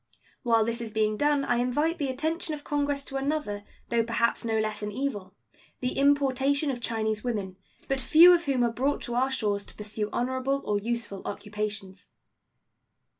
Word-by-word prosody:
While 230 -3 +3
this 235 +1 -2
is 230 - -4
being 215 -1 +1
done 290 +2 +2
I 245 - +1
invite 295 +8 0
the 285 - 0
attention 315 +4 -2
of 290 - -11
Congress 285 -1 -1
to 270 - -4
another, 270 -8 -2 0.3
though 235 -1 +2
perhaps 235 +1 0
no 225 -1 0
less 215 -1 -1
an 210 0 -3
evil 205 -6 -4 0.4
the 250 0 -2
importation 280 +1 +2
of 245 -2 -5
Chinese 220 -2 -1
women, 205 -6 -3 0.3
but 270 -1 0
few 335 +7 +8
of 345 -1 +2
whom 265 -3 +1
are 235 -1 +1
brought 270 +4 0
to 240 - -3
our 255 +2 +2
shores 210 -6 -1
to - - -12
pursue 210 0 -4
honorable 260 +3 -1
or 205 -1 +1
useful 225 -2 -3
occupations. 205 -2 -5
245 Hz, 175 wpm, -27 LUFS, 215-280 Hz, 0.4 s, few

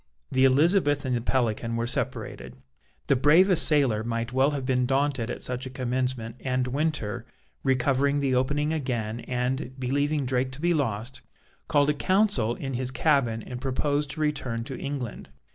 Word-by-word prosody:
The 130 +1 +4
Elizabeth 145 +1 +3
and 130 -1 0
the 120 - -1
Pelican 115 -2 0
were 115 0 -1
separated. 65 - -4 0.5
The 140 - +3
bravest 165 +7 +6
sailor 135 -8 +3
might 115 +1 -3
well 135 +2 +3
have 140 -3 -3
been 125 -1 +1
daunted 135 -3 0
at - - -5
such 125 +1 -3
a - - -6
commencement, 125 -2 -3
and 130 -1 -1
Winter, 140 -5 -2 0.4
recovering 135 +2 +2
the 135 -2 0
opening 145 +4 +1
again 120 -7 -2
and, 125 +2 -3
believing 140 +3 0
Drake 130 0 0
to 130 - -9
be 175 +2 +2
lost, 130 -4 -2 0.5
called 145 0 +3
a - - -1
council 165 - +1
in 135 -1 -5
his 125 0 -2
cabin 130 -6 +1
and 125 0 -7
proposed 145 +2 -1
to 155 - -6
return 130 -6 -1
to 130 +2 -7
England. 130 - -5
130 Hz, 165 wpm, -26 LUFS, 125-145 Hz, 0.5 s, bravest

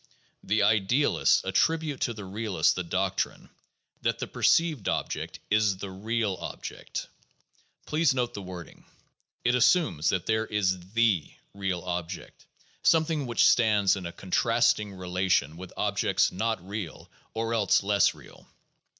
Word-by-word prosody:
The 105 +2 +1
idealists 110 +7 +3
attribute 155 +9 +1
to 120 - -1
the 105 -2 -8
realists 100 -4 +1
the 90 - -3
doctrine 95 +2 -2 0.5
that - - 0
"the - - -3
per - - -10
ceived 160 - +3
object - - -2
is 105 -2 +3
the 95 0 -7
real 105 0 -2
object." - - -6 0.8
Please 155 -1 +2
note 125 -2 -1
the 100 - -6
wording; 90 -3 -10 0.6
it 120 - +3
assumes 125 - +3
that 95 -3 -1
there 110 0 0
is 95 -2 -1
the 110 -9 +2 0.2
real 95 -3 -2
object, 90 -2 -6 0.3
something 160 -4 +2
which 120 - +4
stands 105 -5 +4
in 95 -3 -5
a - - -6
contrasting 115 +3 +1
relation 90 -4 0
with 90 +1 -9
objects - - +1
not 110 -1 -2
real 100 -5 -6 0.3
or 115 +1 -1
else 105 -3 +3
less 100 0 +3
real. - - -16
105 Hz, 140 wpm, -27 LUFS, 95-115 Hz, 0.8 s, which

